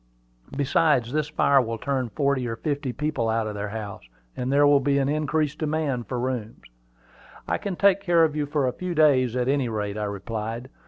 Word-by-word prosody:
Besides, 140 Hz, -3 st, +2 dB
this 150 Hz, -1 st, 0 dB
fire 140 Hz, -3 st, +4 dB
will 115 Hz, -2 st, -3 dB
turn 130 Hz, 0 st, -2 dB
forty 140 Hz, -2 st, 0 dB
or 115 Hz, -, -3 dB
fifty 145 Hz, 0 st, -2 dB
people 135 Hz, -3 st, -2 dB
out 110 Hz, 0 st, 0 dB
of 105 Hz, -, -4 dB
their 105 Hz, 0 st, -4 dB
house, 105 Hz, -2 st, -6 dB, 0.3 s
and 125 Hz, +1 st, -2 dB
there 145 Hz, +1 st, +5 dB
will 145 Hz, -1 st, +5 dB
be 140 Hz, +1 st, +1 dB
an 135 Hz, -1 st, +1 dB
increased 150 Hz, 0 st, -1 dB
demand 150 Hz, -6 st, -1 dB
for 125 Hz, -, -3 dB
rooms." 120 Hz, -3 st, -4 dB, 0.8 s
"I -, -, 0 dB
can 200 Hz, -3 st, -4 dB
take 200 Hz, +1 st, +4 dB
care 175 Hz, -4 st, +4 dB
of 155 Hz, -2 st, +1 dB
you 150 Hz, -1 st, -1 dB
for 145 Hz, -2 st, 0 dB
a 125 Hz, -, -1 dB
few 180 Hz, -1 st, -4 dB
days, 130 Hz, -6 st, +4 dB
at 125 Hz, 0 st, 0 dB
any 135 Hz, -3 st, +1 dB
rate," 105 Hz, -1 st, -3 dB
I 105 Hz, -, -1 dB
replied. 110 Hz, +5 st, -5 dB
135 Hz, 205 wpm, -25 LUFS, 115-150 Hz, 0.8 s, there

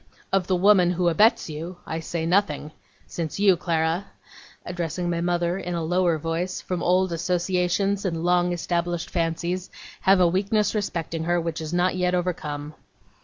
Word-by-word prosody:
Of 190 Hz, -2 st, +2 dB
the 185 Hz, -, +2 dB
woman 185 Hz, -1 st, +5 dB
who 175 Hz, 0 st, +2 dB
abets 210 Hz, +7 st, +3 dB
you, 165 Hz, +3 st, -6 dB
I 160 Hz, -, -3 dB
say 160 Hz, 0 st, -3 dB
nothing 165 Hz, -5 st, +1 dB, 0.3 s
since 165 Hz, +2 st, -5 dB
you, 200 Hz, -2 st, +5 dB
Clara,' 165 Hz, +2 st, -1 dB, 0.6 s
addressing 175 Hz, 0 st, -3 dB
my 170 Hz, 0 st, -1 dB
mother 175 Hz, +1 st, 0 dB
in 180 Hz, -2 st, -4 dB
a 170 Hz, -, -2 dB
lower 175 Hz, 0 st, +2 dB
voice, 165 Hz, +4 st, -2 dB
'from 180 Hz, -2 st, -4 dB
old 185 Hz, +1 st, +2 dB
associations 180 Hz, +3 st, 0 dB
and 165 Hz, -4 st, -2 dB
long 175 Hz, 0 st, +2 dB
established 175 Hz, 0 st, -2 dB
fancies, 170 Hz, +2 st, -2 dB, 0.3 s
have 195 Hz, 0 st, +4 dB
a 180 Hz, -, +5 dB
weakness 200 Hz, +3 st, +1 dB
respecting 165 Hz, -6 st, -3 dB
her 175 Hz, +1 st, +2 dB
which 165 Hz, -1 st, -3 dB
is 155 Hz, 0 st, -5 dB
not 180 Hz, +1 st, +1 dB
yet 180 Hz, 0 st, +1 dB
overcome. 150 Hz, -4 st, -3 dB
175 Hz, 165 wpm, -24 LUFS, 165-185 Hz, 0.6 s, woman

